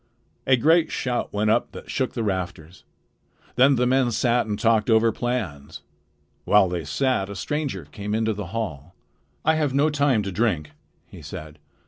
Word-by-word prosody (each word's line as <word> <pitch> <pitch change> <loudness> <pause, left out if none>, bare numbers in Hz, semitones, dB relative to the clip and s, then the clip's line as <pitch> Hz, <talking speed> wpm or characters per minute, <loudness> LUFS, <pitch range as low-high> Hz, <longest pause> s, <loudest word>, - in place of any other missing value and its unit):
A 130 - +5
great 160 +6 +3
shout 125 -3 -2
went 105 +1 +1
up 115 - 0
that - - -9
shook 130 -2 -1
the 115 - -1
rafters. 90 -4 -4 0.7
Then 135 +3 +5
the 125 0 +1
men 130 0 +2
sat 120 +1 +1
and 105 -1 -2
talked 110 0 +2
over 115 0 +4
plans. 105 - -4 0.6
While 105 -2 +4
they 85 -3 -3
sat, 100 - 0
a 100 - -6
stranger 115 - -3
came 100 +7 -5
into 110 0 0
the 100 -3 -6
hall. 90 -6 -5 0.5
"I 160 - +4
have 150 -4 0
no 150 +3 +3
time 140 -7 +2
to 100 - -4
drink," 90 -7 -1 0.3
he - - -13
said. 75 -1 -9
110 Hz, 170 wpm, -24 LUFS, 95-130 Hz, 0.7 s, A